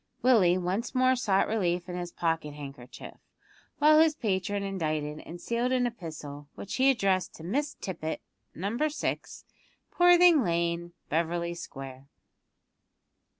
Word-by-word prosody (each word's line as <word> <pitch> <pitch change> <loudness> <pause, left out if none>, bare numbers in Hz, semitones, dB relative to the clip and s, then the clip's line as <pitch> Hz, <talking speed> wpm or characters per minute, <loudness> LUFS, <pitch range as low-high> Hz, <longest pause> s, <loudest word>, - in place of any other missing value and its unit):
Willie 205 -9 +5
once 185 +8 -2
more 255 0 +4
sought 200 -6 +2
relief 180 -5 0
in 180 - -5
his 175 -1 -5
pocket 165 -4 -2
handkerchief, 135 -4 -10 0.6
while 305 +1 +6
his 320 -1 +4
patron 200 - -1
indited 155 -6 -2
and 175 +1 -8
sealed 235 +5 -1
an 255 -1 +2
epistle, 155 -10 -7
which 200 - -7
he 265 +1 +5
addressed 195 -7 +1
to 160 - -11
"Miss 275 - -2
Tippet, 160 -4 -4 0.4
Number 230 - -1
6, 300 - -4 0.5
Poorthing 350 -4 +6
Lane, 170 -1 -1 0.2
Beverly 170 +2 -1
Square." 135 -5 -9
185 Hz, 130 wpm, -28 LUFS, 165-245 Hz, 0.6 s, while